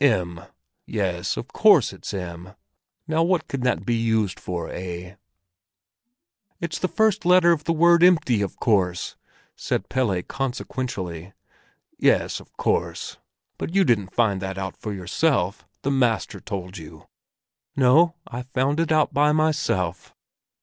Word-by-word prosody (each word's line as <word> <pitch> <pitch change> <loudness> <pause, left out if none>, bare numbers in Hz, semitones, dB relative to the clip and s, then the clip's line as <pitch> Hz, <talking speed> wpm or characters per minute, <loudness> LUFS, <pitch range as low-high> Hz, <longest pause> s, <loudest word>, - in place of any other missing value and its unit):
M, 90 -10 +1 0.5
yes—of - - -2
course - - +5
it's - - -7
M! 90 -1 -7 0.5
Now 160 +1 +1
what 175 +1 +1
can 135 - -4
that 125 -1 0
be 120 - +1
used 110 -4 0
for, 90 -2 -4
eh?" 90 0 -6 1.5
"It's 170 - -4
the 185 - 0
first 220 0 +1
letter 180 -1 +5
in 165 - -1
the 155 +3 -2
word 170 +1 +5
'empty,' 160 - +4
of 100 - -3
course!" 95 -6 +1 0.4
said - - -3
Pelle 115 -9 +1
consequentially. 105 -9 -4 0.7
"Yes, - - +2
of - - -17
course! - - -1 0.4
But 170 - -4
you 195 - +5
didn't 105 - 0
find 100 -5 +2
that 95 0 -4
out 95 0 -4
for 105 - -6
yourself; 100 - -1 0.2
the 140 - 0
master 125 -4 0
told 95 -2 -6
you." 80 0 -12 0.7
"No, 150 +6 +4
I 120 - -6
found 130 +4 -1
it 165 -1 0
out 155 -1 +3
by 150 +1 +3
myself." 150 - 0
120 Hz, 140 wpm, -24 LUFS, 95-155 Hz, 1.5 s, course